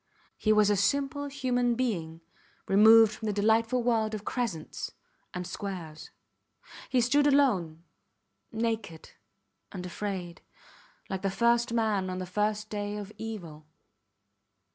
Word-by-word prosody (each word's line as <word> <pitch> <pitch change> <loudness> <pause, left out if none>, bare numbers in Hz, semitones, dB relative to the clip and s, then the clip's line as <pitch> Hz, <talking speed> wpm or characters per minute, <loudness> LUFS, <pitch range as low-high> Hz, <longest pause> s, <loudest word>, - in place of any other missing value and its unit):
He 215 - +1
was 210 -1 +4
a - - +3
simple 280 +8 0
human 250 -4 0
being 170 -10 -2 0.5
removed 220 +2 +7
from 220 - -6
the - - +1
delightful 225 +4 +2
world 220 -2 +1
of 210 -1 -8
crescents 215 -11 -4 0.4
and 180 0 -5
squares. 170 -6 -7 0.8
He 255 -2 +3
stood 285 +5 +3
alone, 190 - +2 0.7
naked 225 -7 -3 0.6
and 180 -3 -6
afraid, 180 -2 -5 0.7
like 190 -1 -4
the 195 - 0
first 235 +3 +2
man 215 -5 0
on 185 - -4
the 185 - -4
first 210 +3 -2
day 205 0 -3
of 205 0 -7
evil. 170 -9 -7
215 Hz, 125 wpm, -29 LUFS, 185-235 Hz, 0.8 s, removed